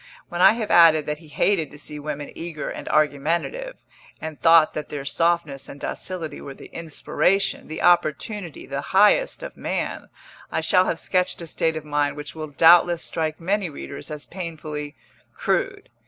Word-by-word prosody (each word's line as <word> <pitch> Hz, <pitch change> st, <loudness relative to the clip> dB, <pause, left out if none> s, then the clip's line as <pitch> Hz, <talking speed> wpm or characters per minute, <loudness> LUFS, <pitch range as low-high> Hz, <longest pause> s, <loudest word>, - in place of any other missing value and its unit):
When 175 Hz, 0 st, -3 dB
I -, -, +8 dB
have 225 Hz, -2 st, -3 dB
added 160 Hz, -3 st, +6 dB
that 150 Hz, 0 st, -3 dB
he 160 Hz, -, -16 dB
hated 160 Hz, +1 st, +1 dB
to -, -, -13 dB
see 150 Hz, 0 st, -6 dB
women 145 Hz, -1 st, -5 dB
eager 165 Hz, -3 st, -5 dB
and -, -, -7 dB
argumentative, 165 Hz, -, 0 dB, 0.4 s
and 160 Hz, -1 st, -7 dB
thought 165 Hz, -1 st, +6 dB
that 150 Hz, -, -5 dB
their 145 Hz, -2 st, -5 dB
softness 165 Hz, -2 st, 0 dB
and 140 Hz, -, -10 dB
docility 175 Hz, -1 st, -5 dB
were 140 Hz, -, -8 dB
the -, -, -14 dB
inspiration, 170 Hz, +4 st, 0 dB
the 155 Hz, -, -5 dB
opportunity 175 Hz, -, +1 dB
(the 140 Hz, 0 st, -4 dB
highest) 345 Hz, -, +3 dB
of -, -, -7 dB
man, -, -, -3 dB, 0.4 s
I -, -, 0 dB
shall 185 Hz, 0 st, +4 dB
have 165 Hz, -, -1 dB
sketched 185 Hz, -1 st, 0 dB
a -, -, -6 dB
state 160 Hz, 0 st, 0 dB
of 155 Hz, -, -7 dB
mind 145 Hz, -1 st, 0 dB
which 150 Hz, 0 st, -7 dB
will 155 Hz, -1 st, -6 dB
doubtless 170 Hz, +3 st, +5 dB
strike 155 Hz, -1 st, -2 dB
many 190 Hz, +2 st, 0 dB
readers 140 Hz, -1 st, -8 dB
as 150 Hz, -1 st, -7 dB
painfully 155 Hz, -5 st, -6 dB, 0.4 s
crude. -, -, -1 dB
160 Hz, 170 wpm, -23 LUFS, 150-175 Hz, 0.4 s, I